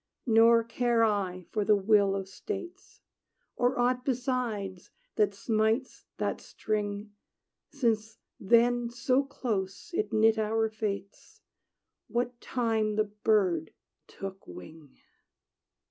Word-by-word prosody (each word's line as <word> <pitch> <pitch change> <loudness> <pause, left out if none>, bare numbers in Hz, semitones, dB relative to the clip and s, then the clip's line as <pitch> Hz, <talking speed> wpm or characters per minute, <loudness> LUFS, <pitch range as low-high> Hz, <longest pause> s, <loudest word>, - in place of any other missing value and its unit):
Nor 230 -1 +5
care 235 0 +1
I 190 -4 0
for 215 - 0
the 210 +1 +4
will 200 -1 +3
of 195 -1 -4
states. 370 - -8 0.5
Or 245 +1 +1
aught 250 +1 +1
besides, 240 -8 -2 0.3
that 205 -2 +2
smites 220 +4 0
that - - -2
string, 205 -1 -3 0.6
Since 225 -5 -1 0.2
then 235 +3 +3
so 250 +2 +1
close 215 - -4
it 215 -9 -1
knit 220 0 +4
our 220 +1 +1
fates, 200 -2 -6 0.7
What 240 +2 -2
time 225 -4 0
the 215 - +3 0.2
bird 185 -8 +2 0.3
took 195 0 -8
wing! 135 - -12
220 Hz, 110 wpm, -29 LUFS, 200-240 Hz, 0.7 s, Nor